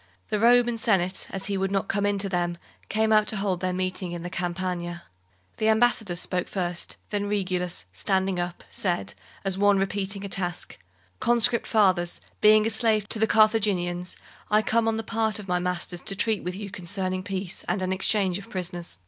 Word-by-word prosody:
The 210 - 0
Roman 240 0 +4
Senate, 190 -4 +1
as 195 0 -3
he 200 -1 -1
would 195 0 0
not 195 0 -1
come 205 0 0
in 205 0 +1
to 195 0 0
them, 175 -2 -1 0.3
came 220 +1 +2
out 215 -1 +4
to - - 0
hold 195 -3 -1
their 185 0 -1
meeting 185 -1 -2
in 170 -1 -5
the 175 - -5
Campagna. 175 -1 -3 0.5
The 220 - +2
ambassadors 220 -5 +2
spoke 180 -1 -1
first; 175 -2 -3
then 205 -1 -1
Regulus, 185 -3 -1
standing 190 -2 0
up, 175 0 -4
said, 175 -3 -1 0.3
as 195 0 0
one 205 0 +5
repeating 195 0 -1
a - - -3
task: 180 -2 -4 0.4
"Conscript 235 0 +4
fathers, 185 -5 +2 0.2
being 215 0 +6
a 225 - +1
slave 220 -2 +2
to 220 - 0
the 220 - +3
Carthaginians, 200 -6 +2 0.3
I 215 +1 +4
come 230 0 +1
on 225 0 +1
the 225 - -3
part 220 -1 0
of 210 -2 -8
my 180 -1 +1
masters 180 0 -2
to 195 - -2
treat 220 +1 +1
with 180 +1 -3
you 200 0 -7
concerning 185 +1 -3
peace 190 0 -4
and 185 +2 0
an 185 0 0
exchange 190 -1 +2
of 200 - -12
prisoners." 175 - -3
195 Hz, 190 wpm, -26 LUFS, 180-215 Hz, 0.5 s, being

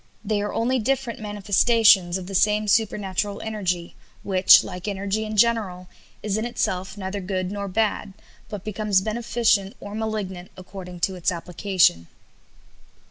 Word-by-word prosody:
They 205 0 0
are 205 - -3
only 250 +3 0
different 255 0 -1
manifestations 205 -2 +3
of 185 - -7
the 195 - -8
same 210 +2 +2
supernatural 205 -2 0
energy, 185 -6 -3 0.3
which, 190 -1 +6
like 180 +1 -7
energy 200 +2 -2
in 215 0 -5
general, 200 -6 +1 0.3
is 210 -1 -1
in 220 - -2
itself 190 -5 -3
neither 195 +1 -4
good 185 0 -3
nor 200 0 -4
bad, 210 0 -1 0.4
but 205 -3 -7
becomes 210 -2 0
beneficent 220 -2 0
or 205 - -9
malignant 210 -5 -4
according 185 -1 -10
to 190 - +1
its 180 +1 -1
application." 175 - +1
200 Hz, 140 wpm, -23 LUFS, 185-215 Hz, 0.4 s, which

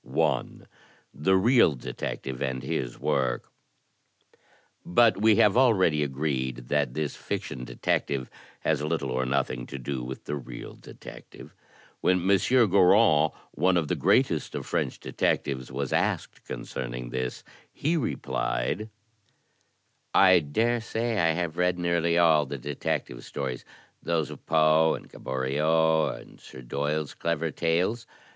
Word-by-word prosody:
I. - - +1 0.7
The 95 +6 +2
Real 115 - +4
Detective 65 +1 -5
and 65 -2 -2
His 60 -2 -3
Work 65 -3 -1 1.3
But 110 +2 +3
we 110 0 +5
have 105 +1 +4
already 95 -12 +4
agreed 65 -3 -2
that 70 -4 0
this 75 -2 -2
fiction 60 -2 -5
detective 65 0 -1 0.3
has 75 -2 0
little 75 -3 -2
or 65 0 -1
nothing 65 -2 -1
to 70 - -7
do 65 0 -4
with 65 +2 -7
the 75 - -3
real 65 -3 -8
detective. - - -13 0.5
When 90 0 +1
M. 100 0 +5 0.3
Goron, 95 -3 +5 0.2
one 90 +3 +2
of 80 -4 -1
the - - +1
greatest - - +1
of - - -4
French - - -2
detectives, 65 -2 -1
was 70 0 -3
asked - - -1
concerning - - -6
this, 65 -1 -4 0.3
he 160 +4 -1
replied: 110 - -2 1.3
"I 95 -2 +7
dare 115 +11 0
say 115 0 -2
I 80 -1 +3
have 85 -1 -3
read 90 0 +1
nearly 85 -1 +1
all 80 -4 +4
the 70 +1 -5
detective 60 -3 -3
stories, 65 -3 -5 0.4
those 80 -4 -1
of - - -11
Poe 80 0 +4
and - - -11
Gaboriau, 80 +5 +1
and - - -16
*Sir 65 - -12
Doyle's' 75 +4 -2
clever 85 -1 -2
tales. 90 +10 0
75 Hz, 135 wpm, -27 LUFS, 65-90 Hz, 1.3 s, I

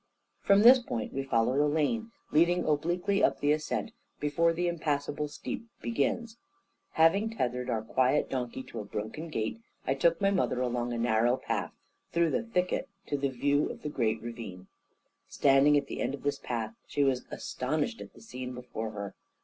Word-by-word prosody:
From 200 0 +5
this 255 +3 +9
point 115 - -4
we 135 - -1
followed 130 0 +1
a - - +3
lane, 225 +10 0 0.2
leading 170 +3 +3
obliquely 175 +6 +1
up - - +3
the 145 - +2
ascent, 155 +8 -1 0.3
before 165 +3 +2
the 175 +2 -1
impassable 150 -3 -1
steep 150 +9 -6
begins. 230 0 -1 0.6
Having 200 +8 +3
tethered 125 0 -1
our 110 -2 0
quiet 130 +5 +2
donkey 130 0 -3
to 115 - -8
a - - -4
broken 110 +10 -5
gate, 115 - -3 0.2
I 135 - +2
took 165 +5 +2
my 195 0 +3
mother 185 -9 +1
along 120 -1 -1
a 120 - -2
narrow 120 +1 +2
path - - -3 0.4
through 170 -1 +3
the - - +1
thicket 180 -6 -1 0.2
to - - +1
the 140 -1 0
view 140 +3 +1
of - - -8
the 150 - -2
great 115 -6 0
ravine. 115 -6 -7 0.6
Standing 140 +1 +5
at 140 - 0
the - - -5
end 140 - 0
of 140 - -15
this 145 0 0
path, 115 -3 -3
she 145 - +1
was 130 -2 +1
astonished 155 - -2
at - - -10
the - - -15
scene 125 - -6
before 120 -3 -5
her. 100 -2 -6
145 Hz, 180 wpm, -30 LUFS, 125-170 Hz, 0.6 s, this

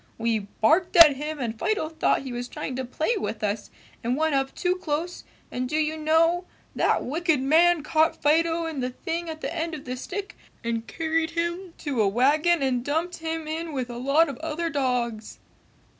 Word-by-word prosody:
We 225 -1 +1
barked 305 - +1
at 325 -5 +9
him 300 +3 -4
and 230 -4 -4
Fido 425 -7 0
thought 315 -3 0
he 260 -2 -6
was 245 0 -4
trying 255 - -5
to 260 - -2
play 310 - -1
with 225 - -4
us 205 0 -2 0.3
and 245 +3 0
went 315 0 +1
up 270 0 0
too 360 0 0
close 340 +1 -3 0.3
and 250 0 -3
do 305 - -2
you 310 0 +1
know, 325 +3 +2 0.3
that - - +1
wicked 320 +2 +1
man 320 +4 +4
caught 315 +1 +2
Fido 330 +2 +2
in 320 -4 -4
the 250 0 -1
thing 330 +5 -4
at 315 0 -7
the - - -4
end 330 -1 -2
of 290 - -10
the 255 0 -4
stick 395 +10 -6 0.3
and 230 -1 -2
carried 320 0 -1
him 340 +1 -2
to 280 -7 -1
a 205 - +3
wagon 290 - +3
and 250 -2 0
dumped 320 +6 -1
him 320 -1 -4
in 320 +1 -4
with 255 -3 -3
a 240 - -6
lot 280 +6 +3
of 275 -4 -6
other 325 +1 -3
dogs!" 245 -6 -1
310 Hz, 200 wpm, -25 LUFS, 255-330 Hz, 0.3 s, at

